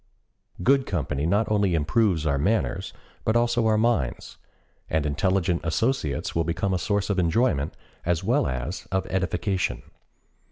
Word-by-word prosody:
Good 135 +3 +3
company 75 -4 -1
not 100 +5 +2
only 100 -4 +2
improves 80 +1 +1
our 70 -2 +1
manners, 95 +2 0 0.3
but 110 - +1
also 120 -1 +2
our 110 -1 +3
minds, 110 - 0 0.5
and 80 -1 0
intelligent 90 +3 +1
associates 80 - -1
will 85 - +2
become 85 +4 -1
a 90 - 0
source 100 0 0
of 95 - 0
enjoyment 85 - +1 0.3
as 85 -1 0
well - - +2
as 65 +7 -4
of 95 0 0
edification. 95 - -1
95 Hz, 145 wpm, -25 LUFS, 80-110 Hz, 0.5 s, Good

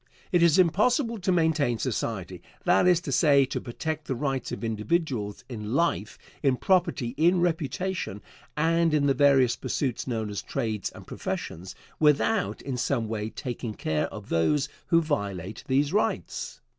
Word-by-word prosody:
It 175 - +3
is 170 -2 +5
impossible 225 - +3
to 185 0 0
maintain 160 -8 +2
society 100 -7 -3 0.2
that - - +4
is 180 -2 +5
to - - -5
say, 140 -4 +5
to 130 - -4
protect 155 +5 -4
the 135 - -1
rights 135 0 -2
of - - -5
individuals 115 - -1
in 110 -1 -5
life, 110 - 0 0.2
in 135 -3 +3
property, 170 -10 +1
in 175 +4 +4
reputation, 170 - -2 0.3
and 165 0 +3
in 145 -1 +2
the 140 - +4
various 135 -4 +4
pursuits 130 +2 -2
known 110 -4 -2
as 100 - -3
trades 110 -7 -2
and - - -12
professions, 90 +3 -5 0.2
without 155 +8 +2
in 130 -3 -3
some 120 -2 0
way 110 -1 -3
taking 120 -3 -5
care 80 -1 -1
of 105 -2 -10
those 140 - +2 0.2
who 165 0 +4
violate 100 - -3
these 140 +4 +1
rights. 210 - -1
140 Hz, 155 wpm, -27 LUFS, 110-165 Hz, 0.3 s, is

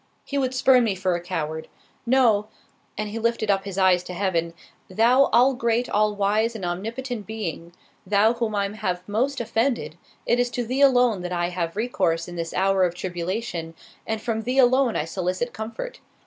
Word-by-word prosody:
He 280 - -2
would 260 -1 -1
spurn 255 -1 +5
me 210 -4 0
for 185 0 0
a 175 - -2
coward. 160 -3 -4 0.4
No"——(and 220 -3 0
he 225 - -4
lifted 230 -2 +1
up 195 0 0
his 195 -2 -6
eyes 185 -2 +4
to 180 - -7
Heaven) 170 -3 -1 0.3
"Thou 235 +8 +4
all 250 +4 +4
great, 235 0 0
all 210 0 +1
wise 210 +3 +1
and 195 -5 -5
omnipotent 225 +5 -4
Being, 180 -6 -5 0.3
Thou 205 +4 +3
whom 230 -3 -2
I 200 -1 +1
have 180 -3 -3
most 255 +7 0
offended, 225 - -1 0.3
it 240 - +2
is 245 0 +2
to 240 0 -3
Thee 255 +4 -1
alone 245 -7 +4
that 180 0 -5
I 175 -1 0
have 175 -1 -3
recourse 185 -7 0
in 175 - -8
this 165 -1 -4
hour 190 0 +2
of 175 -1 0
tribulation, 175 -1 -4 0.3
and 220 0 -1
from 225 0 -2
Thee 250 +4 -2
alone 255 -1 +4
I 150 - 0
solicit 185 +7 -2
comfort. 230 - -6
210 Hz, 185 wpm, -24 LUFS, 180-240 Hz, 0.4 s, spurn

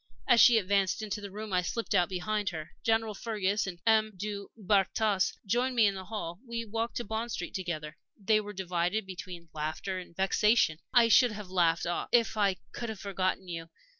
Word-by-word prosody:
As 235 - +6
she 240 -2 +8
advanced 200 0 +1
into 210 0 -4
the 200 - -6
room, 210 +1 -7
I 180 - +3
slipped 225 +6 -3
out 180 -3 +3
behind 195 +2 -1
her. 160 -4 -7
General 225 -1 +1
Fergus 205 -2 -1
and 175 -2 -6
M. 220 -1 +3
du 200 +1 -5
Bartas 200 0 +1
joined 245 +5 0
me 230 -2 +5
in 200 - +3
the 190 -1 -7
hall. 180 -5 -5
We 235 -2 -4
walked 225 +2 -3
to 240 - -2
Bond 220 +2 -3
Street - - -4
together. 155 -5 -4 0.2
They 215 +1 +2
were 205 0 -7
divided 185 +1 -1
between 180 -2 -8
laughter 155 +5 -3
and 175 -2 -12
vexation. 190 -3 +3
I 240 -2 +6
should 235 0 +5
have 205 -3 -8
laughed 170 -3 +2 0.3
if 235 -2 +3
I 200 -3 +2 0.2
could 235 - -5
have 220 -3 -6
forgotten 190 -1 -2
you. 165 -1 -6
200 Hz, 195 wpm, -30 LUFS, 185-220 Hz, 0.3 s, she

